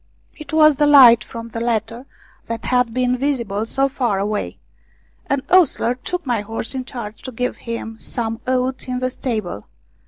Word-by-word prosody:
It 305 - -10
was 310 -2 +5
the 295 - +3
light 245 -6 +8
from 230 +1 -8
the 230 - -5
latter 230 +2 -2 0.4
that 230 0 -5
had 250 -2 +2
been 250 +1 0
visible 235 -7 -1
so 270 +3 +1
far 245 -7 -1
away. 205 +2 -2 0.7
An 275 -1 0
ostler 340 -9 +4
took 355 +7 -5
my 240 -5 0
horse 225 +3 -4
in 260 -1 -4
charge 220 -4 -8
to 260 - -7
give 250 +1 -3
him 230 -1 -6
some 225 -2 -4
oats 255 0 -1
in 250 0 -2
the 255 0 -1
stable. 215 - -4
245 Hz, 175 wpm, -20 LUFS, 225-260 Hz, 0.7 s, light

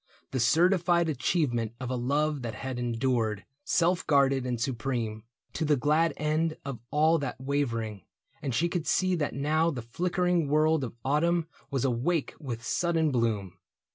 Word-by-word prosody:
The 130 - -1
certified 170 +5 +3
achievement 130 -5 0
of 130 -1 -4
a - - 0
love 145 +4 0
That 115 -3 -5
had 130 +1 -5
endured, 115 -3 0 0.2
self 175 +4 +1
guarded 135 -3 +3
and 120 -2 -2
supreme. 115 -3 -2 0.3
To - - -2
the 150 -1 +3
glad 155 +5 +2
end 155 +1 0
of 135 -5 -5
all 160 +2 +3
that 135 -4 -4
wavering; 115 -7 -2 0.4
And 130 -4 -2
she 170 - +2
could 170 -2 -3
see 185 0 +2
that 150 -3 -2
now 155 +4 +2
the 125 -7 -4
flickering 180 +5 0
world 155 +1 +3
Of 120 - -5
autumn 165 +4 +2 0.2
was 135 -2 -1
awake 135 +6 0
with 120 -6 -5
sudden 165 -3 +1
bloom. 110 -7 -1
140 Hz, 160 wpm, -28 LUFS, 120-160 Hz, 0.4 s, certified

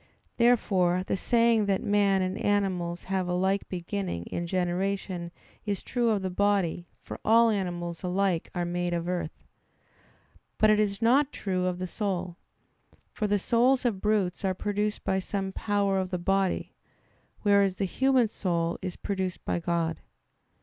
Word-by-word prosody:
Therefore 190 -7 +3
the 190 - -1
saying 230 +1 +3
that 195 -1 +1
man 200 -2 +3
and 185 +1 -2
animals 185 -5 0
have 190 -1 -1
a 180 - 0
like 190 +2 0
beginning 185 - -3
in 170 - -4
generation 185 0 -2 0.3
is 205 -2 -3
true 240 -2 0
of 205 -3 +1
the 185 - -2
body; 185 -3 +1 0.2
for - - -8
all 230 +1 +5
animals 175 -4 -3
alike 185 -2 0
are 175 -1 -1
made 175 0 -2
of 170 0 -3
earth. 175 -3 -4 1.1
But 215 0 +5
it 215 - +3
is 205 0 0
not 270 +5 +4
true 185 -2 -2
of 180 -1 -1
the 185 - -3
soul. 185 -3 -3 0.7
For 210 - -2
the 205 0 +2
souls 250 +6 +2
of 205 -6 0
brutes 210 -3 0
are 190 -1 0
produced 210 +2 -2
by 190 - +1
some 195 0 -3
power 200 -1 0
of 185 -1 -2
the 180 - -2
body; 195 +1 0 0.7
whereas 200 -2 +4
the 195 - -1
human 260 +4 +2
soul 170 -5 -2
is 185 -2 -4
produced 190 -3 -3
by - - 0
God. 170 -1 -1
190 Hz, 160 wpm, -28 LUFS, 180-205 Hz, 1.1 s, all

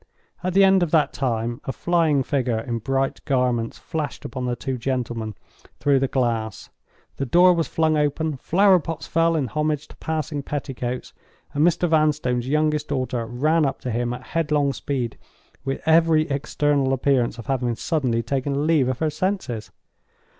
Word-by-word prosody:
At 185 0 -2
the 195 - +7
end 190 -1 +5
of 175 - +1
that 155 -2 +2
time, 120 -1 -2
a - - -1
flying 160 -1 +2
figure 125 -4 0
in 115 +1 -3
bright 135 +4 -1
garments 125 -4 0
flashed 155 -3 -5
upon 130 -2 -4
the 125 -1 -1
two 130 0 -4
gentlemen 120 -4 -3 0.4
through 140 -2 +3
the 135 - +1
glass—the 120 +1 -4
door 180 +6 +6
was 165 -2 0
flung 160 -1 +1
open—flower 160 +6 +2
pots 165 0 -5
fell 165 0 +2
in 150 -4 +1
homage 150 +1 -1
to - - -13
passing 155 -2 -3
petticoats—and 135 +1 -5
Mr. 175 +1 +3
Vanstone's 150 -6 +1
youngest 150 0 +1
daughter 130 -4 -2
ran 155 +7 +2
up 135 -2 -1
to 125 - -3
him 120 +1 -1
at 125 +1 -6
headlong 150 -4 +1
speed, 125 -6 -3 0.4
with 135 0 -2
every 160 -1 +4
external 140 -1 +1
appearance 130 -3 +1
of 115 - -8
having 125 -3 -1
suddenly 125 -5 0
taken 140 +4 -1
leave 155 -5 +3
of 130 - -1
her 155 +1 0
senses. 150 - -2
140 Hz, 160 wpm, -23 LUFS, 125-155 Hz, 0.4 s, the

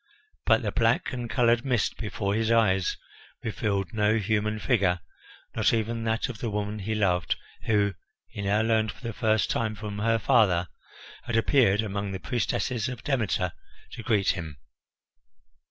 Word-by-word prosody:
But 110 0 +4
the 105 - -1
black 115 +3 +1
and 120 -2 -4
coloured 120 -1 +3
mist 125 -5 0
before 100 -2 -2
his 110 +1 0
eyes 100 -5 +2 0.5
revealed 105 -1 -2
no 105 0 +2
human 105 0 0
figure, 95 -4 +1 0.6
not - - +2
even 115 +1 -2
that 115 +2 0
of 120 -5 -7
the 115 - -2
woman 105 0 -3
he 110 +3 -2
loved, 90 -5 +1 0.3
who, 105 -2 +2 0.3
he 100 - -7
now 100 +2 +2
learned 110 -2 +2
for - - -17
the 115 -1 -4
first 110 -1 +1
time 110 -2 -1
from 105 -1 -6
her 115 +2 +2
father, 105 -8 +3 0.6
had 120 - -2
appeared 115 -4 +3
among 100 -1 -3
the 95 - -4
priestesses 120 +1 -1
of 125 -3 -7
Demeter 110 -9 0 0.4
to - - -7
greet 105 -4 +1
him. 80 -5 -3
110 Hz, 160 wpm, -27 LUFS, 100-115 Hz, 0.6 s, But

